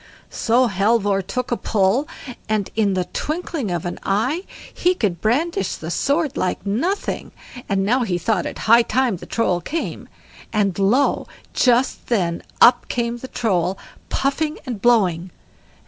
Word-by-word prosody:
So 245 +3 +2
Halvor 200 -1 +2
took 250 +7 -4
a - - +3
pull, 220 +7 +1 0.4
and 215 -3 0
in 205 -3 +2
the 180 -1 0
twinkling 310 - -3
of 175 -2 -2
an 175 - -4
eye 255 - 0 0.3
he 360 +1 +2
could 185 - -1
brandish 325 - 0
the - - -6
sword 285 0 0
like 185 -3 -2
nothing; 270 - -2 0.4
and 195 -1 +1
now 250 +5 +2
he 190 -7 0
thought 185 0 0
it - - -6
high 230 +2 +7
time 240 -2 +1
the - - -11
Troll 185 -6 0
came; 325 - -4 0.4
and 200 -4 0
lo! 235 +9 +2 0.3
just 250 +1 +2
then 175 -8 0 0.2
up 240 0 +6
came 235 -1 -2
the 260 - -7
Troll 190 -6 0 0.3
puffing 300 +3 -1
and 240 -7 -5
blowing. 190 -8 +3
230 Hz, 150 wpm, -21 LUFS, 195-260 Hz, 0.4 s, high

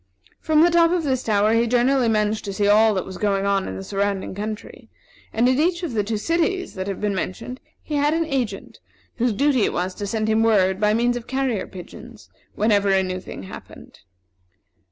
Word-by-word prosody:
From 310 0 +3
the 345 - +4
top 335 -1 +5
of 350 -1 0
this 260 -4 0
tower 210 -1 +2
he 230 +1 +2
generally 245 +1 +2
managed 215 0 0
to 200 - -4
see 205 +1 0
all 215 +1 +5
that 185 - -2
was 190 -1 -9
going 200 -2 0
on 200 -1 +1
in 95 - -5
the 95 - -6
surrounding 200 - -2
country; 210 +2 -7 0.4
and 235 +2 +2
in 260 +2 +2
each 345 +3 +1
of 315 -8 -3
the 210 -2 +1
two 215 +1 -2
cities 340 - -1
that 190 0 -5
have 195 - -4
been 210 -1 -1
mentioned 195 +7 -5 0.2
he 300 - -3
had 295 +2 +2
an 330 0 0
agent, 250 -9 -4 0.4
whose 245 0 +1
duty 270 +4 +2
it - - 0
was 180 +1 -2
to 205 - -5
send 215 +1 -1
him 220 0 +2
word, 195 -4 +3
by 210 0 +2
means 240 +1 +1
of 240 - -9
carrier 260 -5 -1
pigeons, 215 +5 -12 0.2
whenever 205 -2 +2
a 190 -1 +3
new 185 0 -3
thing 180 - -9
happened. 95 - -12
220 Hz, 215 wpm, -22 LUFS, 200-260 Hz, 0.4 s, top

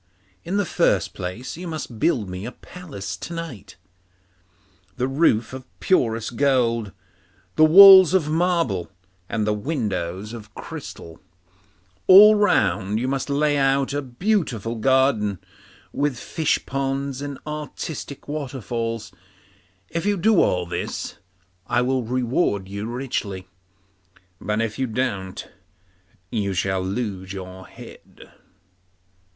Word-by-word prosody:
In 185 +4 -2
the 205 - +1
first - - +1
place 100 - -6
you 180 +1 -7
must 155 -8 -6
build 115 - +1
me 90 +1 -6
a 120 - -5
palace 130 - -8
to 170 - -7
night, 145 - -8 1.2
the 130 0 0
roof 135 -5 +1
of 130 -1 -8
purest 115 - 0
gold, 120 -6 +1 0.6
the 155 - +5
walls 190 +1 +9
of 170 -5 +2
marble, 160 - 0 0.4
and 110 -2 -1
the 105 - +1
windows 105 - -3
of 110 -2 -11
crystal; 80 -1 -9 0.9
all 205 +3 +10
round 105 - +2
you 125 - -2
must 135 +1 -2
lay 145 +1 +1
out 135 0 +1
a 145 - -1
beautiful 130 - -1
garden, 115 -4 +2 0.6
with 145 -3 -1
fish 160 +5 -1
ponds 135 0 -3
and 140 -1 -5
artistic 150 -1 -6
waterfalls. 120 -6 -4 0.8
If 170 +4 -3
you 205 -1 +2
do 210 +1 +4
all 90 -1 +1
this, 85 - -5 0.5
I 120 0 +1
will 130 +1 0
reward 120 - -1
you 100 +2 -5
richly; 115 -7 -4 0.9
but 105 +2 -1
if 110 +1 -4
you 130 - 0
don't, 110 -6 -3 0.8
you 100 -4 -1
shall 95 +1 0
lose 95 -1 -4
your 95 -1 -9
head. - - -14
125 Hz, 125 wpm, -23 LUFS, 105-150 Hz, 1.2 s, all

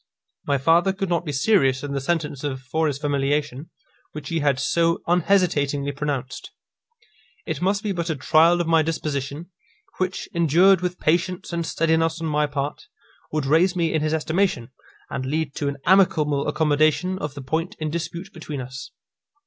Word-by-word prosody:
My 140 -1 +2
father 170 +7 +3
could 195 -1 -3
not 170 -1 0
be 150 - -3
serious 135 -3 +2
in 145 - -4
the 140 - -2
sentence 150 -2 -2
of 135 -3 -3
foris 145 +1 -1
familiation, 145 0 -1 0.4
which 150 -2 -7
he 165 - 0
had 140 -3 +1
so 165 +5 +1
unhesitatingly 165 -6 +1
pronounced. 140 -2 -4 1.0
It 160 -2 -4
must 200 +3 +1
be 210 - -1
but 170 -2 -3
a 160 - 0
trial 160 +5 +4
of - - -1
my 165 0 +4
disposition, 155 0 -3 0.5
which, 185 0 -2
endured 170 +3 +4
with 180 0 -3
patience 175 +2 0
and 170 0 -1
steadiness 165 0 +1
on 165 - -4
my 150 -1 +1
part, 145 - -4 0.4
would 155 -2 -1
raise 165 +6 +3
me 165 -3 0
in 155 - +1
his 155 0 0
estimation, 160 -6 -1 0.4
and 130 - -3
lead 145 +2 -2
to 145 - -1
an 140 0 -3
amicable 155 -7 +3
accommodation 155 +4 +1
of 150 -4 -5
the 140 - -7
point 165 +9 -2
in 155 -1 -3
dispute 170 +4 -5
between 155 -3 -6
us. 130 +2 -7
155 Hz, 170 wpm, -23 LUFS, 140-170 Hz, 1.0 s, trial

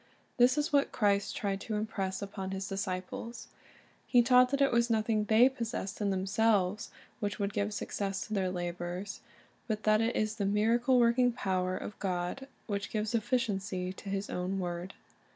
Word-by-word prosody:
This 250 +3 +5
is 295 +1 0
what 280 -1 +3
Christ 200 -2 +1
tried 195 -1 -2
to 220 - -3
im 210 +1 0
press 190 -2 -3
upon 195 -1 -5
His 190 0 -4
dis 195 +1 -3
ciples. 185 +6 -5 0.6
He 245 -2 +5
taught 250 +1 +6
that 280 +1 0
it 275 -1 +4
was 235 0 +2
nothing 215 -1 +1
they 220 +4 +6
possessed 230 -6 -4
in 205 - +1
themiselves 195 +1 +1 0.3
which 205 -2 -2
would 200 -1 -2
give 205 +1 -1
success 200 -1 -3
to 215 - -6
their 190 -3 +1
labors, 175 +2 -4 0.5
but 215 -2 -2
that 215 0 +4
it 230 +2 0
is 215 +1 0
the 200 - 0
miracle 230 +5 +3
working 245 +1 +4
power 185 -4 -1
of 210 - -7
God 185 +7 -2 0.2
which 200 -2 -3
gives 215 +1 -2
ef 225 -2 -1
ficiency 195 -6 -1
to 200 - -9
His 195 +1 -2
own 180 +2 -2
word. 175 0 -4
205 Hz, 185 wpm, -31 LUFS, 190-230 Hz, 0.6 s, taught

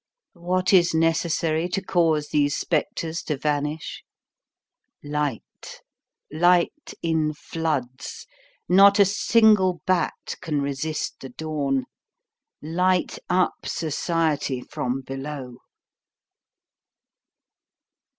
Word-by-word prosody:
What 185 +2 0
is 175 -3 +5
necessary 165 0 +1
to 180 - -1
cause 165 -5 +1
these 145 -1 +2
spectres 165 +1 -2
to 150 - -2
vanish? 150 +2 -2 1.0
Light. 145 -4 -4 0.5
Light 175 - +2
in 160 -2 0
floods. 145 -6 -4 0.4
Not 195 +3 +7
a 200 - +7
single 205 -2 +3
bat 185 -3 -1
can 155 -5 -1
resist 140 +2 -3
the 135 - -8
dawn. 140 -2 -2 0.8
Light 180 +3 0
up 180 0 +2
society 155 -3 -1
from 125 +1 -3
below. 135 -1 -7
160 Hz, 85 wpm, -24 LUFS, 145-180 Hz, 1.0 s, Not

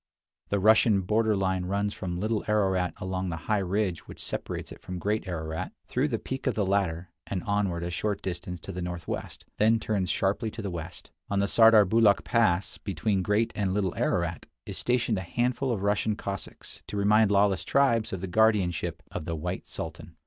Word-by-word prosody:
The 100 - +1
Russian 110 0 +5
border 110 +3 +2
line 95 -2 0
runs 100 +2 -1
from 90 -1 -4
Little 110 +2 0
Ararat 95 -4 +1
along 95 0 -3
the 85 - -2
high 105 -1 +2
ridge 95 -1 -1
which - - -11
separates - - -4
it - - -11
from 90 0 -6
Great 105 +3 -1
Ararat, 80 -2 -4
through 130 +4 0
the 120 -6 -1
peak 130 +4 -5
of 130 - +1
the 105 - +1
latter, 95 -3 0 0.2
and 95 -3 -3
onward 100 -4 0
a 85 - -3
short 105 +3 -2
distance 90 -1 -4
to - - -7
the 90 - -5
northwest, 85 -1 -5
then 110 +1 +4
turns 100 -5 -1
sharply 100 +4 0
to 110 - -7
the 100 - -3
west. 85 -2 -8 0.2
On 100 - 0
the 100 - +3
Sardarbulakh 110 -1 +6
pass, 100 -6 +1
between 95 +1 -1
Great 105 +4 +1
and 100 -2 0
Little 95 -4 0
Ararat, 85 -1 -1 0.2
is - - -6
stationed 120 -4 +1
a - - -3
handful 125 +7 -1
of 100 -4 -2
Russian 105 +1 +1
Cossacks 100 -2 -7
to 105 - -5
remind 105 +1 +4
lawless 100 -3 +3
tribes 115 -2 +2
of 95 - -4
the - - -2
guardianship 90 -5 +1
of - - -5
the 85 - -2
"White 75 - -4
Sultan." - - -7
100 Hz, 190 wpm, -28 LUFS, 90-110 Hz, 0.2 s, Sardarbulakh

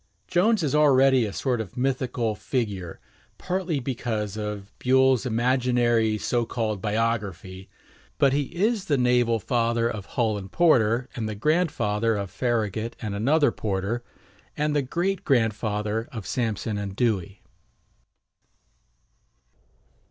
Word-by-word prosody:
Jones 200 +2 +2
is 145 - 0
already 135 -4 +5
a - - -5
sort 125 +1 -1
of 100 -1 -9
mythical 125 -3 -1
figure, 105 -8 -3 0.4
partly 180 -5 -2
because 115 -5 -3
of 105 -2 -5
Buell's 130 0 +3
imaginary 120 -2 +2
so 120 +2 0
called 110 -4 -2
biography; 105 -4 -2 0.5
but 135 -1 +4
he 145 0 +1
is 205 - -1
the 145 -6 +1
naval 125 -2 +3
father 115 +1 +1
of 105 -4 -5
Hull 110 -4 0
and 95 -1 -10
Porter, 125 -8 +3
and 110 -3 -3
the 110 - -4
grandfather 115 - +1
of 100 -2 -4
Farragut 115 -2 -1
and 105 -2 -4
another 145 +9 +3
Porter, 105 +3 -2 0.5
and 150 0 0
the 145 - +3
great 175 +8 -2
grandfather 110 -3 0
of 110 -5 -7
Sampson 110 -3 -2
and 100 -1 -5
Dewey. 105 -4 -1
115 Hz, 125 wpm, -25 LUFS, 105-130 Hz, 0.5 s, already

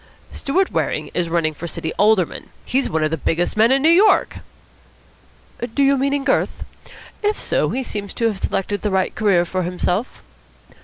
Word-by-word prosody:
"Stewart 365 +7 0
Waring - - -2
is 175 -2 -1
running 165 -2 0
for 170 +3 -7
City 160 0 -4
Alderman. 210 -4 +2 0.2
He's 270 +2 0
one 160 0 0
of 155 - 0
the 160 - -1
biggest 165 +3 -1
men 220 +3 +4
in 270 +1 +3
New 320 - +6
York!" 390 +5 +4 1.4
"Do 280 - +3
you 275 0 +4
mean 275 +1 0
in 280 - -2
girth? 270 - 0 0.6
If 420 0 0
so, - - 0
he 265 - -2
seems 205 -4 -6
to 230 - -1
have 215 -4 0
selected 205 +2 -2
the 210 - -1
right 190 -1 0
career 195 -5 +2
for 185 +2 -2
himself." 180 +5 -2
205 Hz, 185 wpm, -20 LUFS, 175-270 Hz, 1.4 s, New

